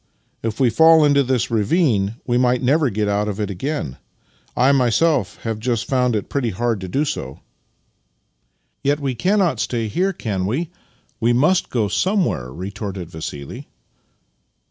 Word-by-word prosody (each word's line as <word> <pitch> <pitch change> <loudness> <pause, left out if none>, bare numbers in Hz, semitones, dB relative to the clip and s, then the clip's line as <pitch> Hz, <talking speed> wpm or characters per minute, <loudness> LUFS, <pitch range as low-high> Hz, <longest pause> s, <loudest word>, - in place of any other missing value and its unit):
If 115 +1 -3
we 125 -3 +3
fall 160 +1 +6
into 145 -1 +4
this 125 -3 0
ravine 110 - +1
we 120 - 0
might 125 0 +2
never 145 +2 +3
get 105 -1 -1
out 105 +1 0
of 105 0 -4
it 105 -1 -2
again. 100 - -4 0.6
I 130 +3 +5
myself 140 +3 +2
have 115 -2 -3
just 120 0 -1
found 125 -3 +1
it 105 - -2
pretty 135 -5 -1
hard 110 +1 -1
to 95 - -5
do 140 +11 0
so." 70 - -5 0.7
" - - -48
Yet 145 +1 +1
we 135 -3 -2
cannot 180 - +1
stay 115 -1 -1
here, 185 - 0
can 100 - -3
we? 150 - -2 0.5
We 120 +1 +2
must 155 +9 +2
go 115 -4 0
sojnewhere," 160 - 0
retorted 95 - -6
Vassili. 75 -3 -7
120 Hz, 160 wpm, -20 LUFS, 105-140 Hz, 0.7 s, fall